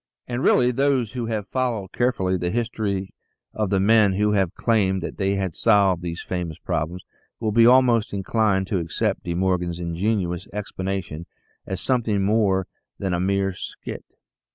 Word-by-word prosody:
And 120 Hz, +1 st, -3 dB
really 125 Hz, -2 st, +4 dB
those 130 Hz, -3 st, +1 dB
who 120 Hz, -3 st, -4 dB
have 110 Hz, -3 st, -3 dB
followed 120 Hz, -7 st, -2 dB
carefully 115 Hz, -7 st, 0 dB
the 90 Hz, -1 st, -1 dB
history 105 Hz, -3 st, -2 dB, 0.4 s
of 105 Hz, -3 st, -1 dB
the 100 Hz, -1 st, +2 dB
men 105 Hz, 0 st, +4 dB
who 105 Hz, +2 st, +1 dB
have 95 Hz, -4 st, +1 dB
claimed 95 Hz, -6 st, +1 dB
that -, -, -5 dB
they 100 Hz, 0 st, +1 dB
had 95 Hz, -4 st, -2 dB
solved 100 Hz, -5 st, +3 dB
these 85 Hz, -1 st, -5 dB
famous 85 Hz, -4 st, -4 dB
problems, 85 Hz, +4 st, -3 dB, 0.4 s
will 110 Hz, -2 st, -1 dB
be 115 Hz, +2 st, +6 dB
almost 125 Hz, -3 st, +4 dB
inclined 100 Hz, 0 st, +1 dB
to 95 Hz, -, +1 dB
accept 85 Hz, -1 st, -2 dB
De 85 Hz, -, -2 dB
Morgan's 90 Hz, -2 st, 0 dB
ingenious 90 Hz, +1 st, -2 dB
explanation 95 Hz, -5 st, -4 dB, 0.4 s
as 95 Hz, -1 st, -3 dB
something 115 Hz, -6 st, +1 dB
more 100 Hz, -2 st, +2 dB, 0.3 s
than 95 Hz, -2 st, -2 dB
a 90 Hz, -, 0 dB
mere 95 Hz, +1 st, 0 dB
" -, -, -17 dB, 0.2 s
skit." -, -, -9 dB
100 Hz, 165 wpm, -23 LUFS, 95-110 Hz, 0.4 s, be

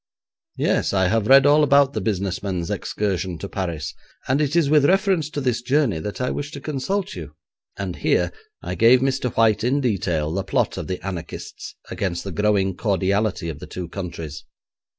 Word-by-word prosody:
'Yes; -, -, +1 dB
I 95 Hz, -2 st, +3 dB
have 110 Hz, -1 st, +1 dB
read 135 Hz, +2 st, +7 dB
all 150 Hz, +1 st, +6 dB
about 140 Hz, -1 st, +4 dB
the 110 Hz, -, -2 dB
business 95 Hz, -2 st, -1 dB
men's 90 Hz, -4 st, -3 dB
excursion 95 Hz, -4 st, -2 dB
to 100 Hz, -, -6 dB
Paris, 85 Hz, -6 st, -4 dB, 0.3 s
and 135 Hz, +3 st, +2 dB
it 150 Hz, +1 st, 0 dB
is 170 Hz, -4 st, +4 dB
with 150 Hz, -1 st, +4 dB
reference 190 Hz, -4 st, +2 dB
to 150 Hz, -, -4 dB
this 125 Hz, -4 st, 0 dB
journey 130 Hz, -, +1 dB
that 100 Hz, +6 st, -5 dB
I 125 Hz, 0 st, 0 dB
wish 145 Hz, 0 st, -4 dB
to 140 Hz, -, -6 dB
consult 155 Hz, +8 st, -2 dB
you,' -, -, -8 dB, 0.4 s
and -, -, -4 dB
here -, -, +1 dB, 0.3 s
I -, -, -3 dB
gave 120 Hz, +2 st, +5 dB
Mr. 135 Hz, -2 st, 0 dB
White 110 Hz, -1 st, +3 dB
in 130 Hz, +4 st, +2 dB
detail 90 Hz, -, 0 dB
the 95 Hz, +1 st, -1 dB
plot -, -, 0 dB
of -, -, -5 dB
the 90 Hz, 0 st, -5 dB
anarchists 90 Hz, -4 st, -7 dB, 0.2 s
against 85 Hz, -3 st, -2 dB
the 100 Hz, -, -5 dB
growing 100 Hz, 0 st, +1 dB
cordiality 100 Hz, -1 st, 0 dB
of 80 Hz, -4 st, -5 dB
the -, -, -9 dB
two 90 Hz, -2 st, -6 dB
countries. 85 Hz, -5 st, -6 dB
105 Hz, 190 wpm, -22 LUFS, 95-135 Hz, 0.4 s, read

